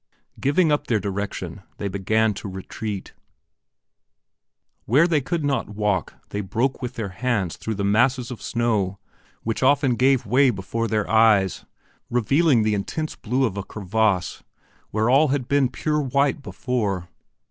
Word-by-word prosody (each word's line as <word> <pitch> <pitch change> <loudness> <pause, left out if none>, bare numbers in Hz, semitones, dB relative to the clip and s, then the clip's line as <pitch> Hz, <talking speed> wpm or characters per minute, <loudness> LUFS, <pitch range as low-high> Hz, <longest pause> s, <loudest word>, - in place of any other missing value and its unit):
Giving 150 +4 +2
up 145 - 0
their 110 -3 +2
direction, 100 -3 -4 0.2
they 100 - -3
began, 105 +3 +1
to 100 - -7
retreat. 95 +2 -6 1.7
Where 140 +9 +4
they 160 -4 +2
could 150 +3 -2
not 140 -6 0
walk 105 -4 -1
they 100 - -3
broke 115 +9 -1
with 125 - -5
their 110 -4 -3
hands 100 -3 -1
through 110 - -4
the 100 - -3
masses 120 +5 +2
of 120 - -7
snow 105 -5 0 0.5
which 115 0 -2
often 135 -1 +3
gave 130 +1 +3
way 130 +5 +4
before 115 +2 -2
their 110 -2 0
eyes, 110 -4 +3 0.4
revealing 125 +2 +3
the 105 0 +1
intense 155 +10 -3
blue 130 +4 0
of 100 -5 -3
a 100 - -2
crevasse 100 -4 -1 0.5
where 110 +1 0
all 135 +5 +5
had 135 -3 -1
been 140 -3 +2
pure 150 +4 -1
white 140 +1 +1
before. 105 -10 -2
115 Hz, 150 wpm, -23 LUFS, 100-135 Hz, 1.7 s, all